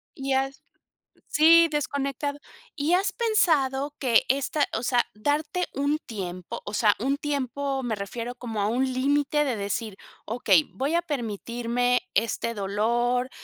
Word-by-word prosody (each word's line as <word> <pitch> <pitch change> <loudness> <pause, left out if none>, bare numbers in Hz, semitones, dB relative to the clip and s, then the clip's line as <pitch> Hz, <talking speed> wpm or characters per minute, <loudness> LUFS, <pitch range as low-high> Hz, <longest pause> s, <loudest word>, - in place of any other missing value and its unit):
Y 270 -1 -3
has 270 +1 -1 0.7
sí, 330 +2 +6
desconectado. 285 0 -2 0.4
¿Y 310 +3 0
has 390 +2 +2
pensado 295 - +1
que 245 -4 +4
esta 280 +2 +1
o 225 - -4
sea, 245 -1 +3
darte 300 - 0
un 285 +2 +1
tiempo, 185 -5 -6
o 205 - -6
sea, 210 -1 +3
un 275 +4 0
tiempo 280 -1 -2
me 230 -3 -1
refiero 230 +5 -5
como 225 -4 -4
a 200 - +1
un 260 +4 0
límite 285 +3 +2
de 260 -4 -1
decir: 205 0 -3 0.3
"Okey, 205 -7 +3
voy 275 - -1
a 345 - +3
permitirme 245 - -1
este 230 +1 0
dolor, 235 +5 0
260 Hz, 145 wpm, -26 LUFS, 230-290 Hz, 0.7 s, sí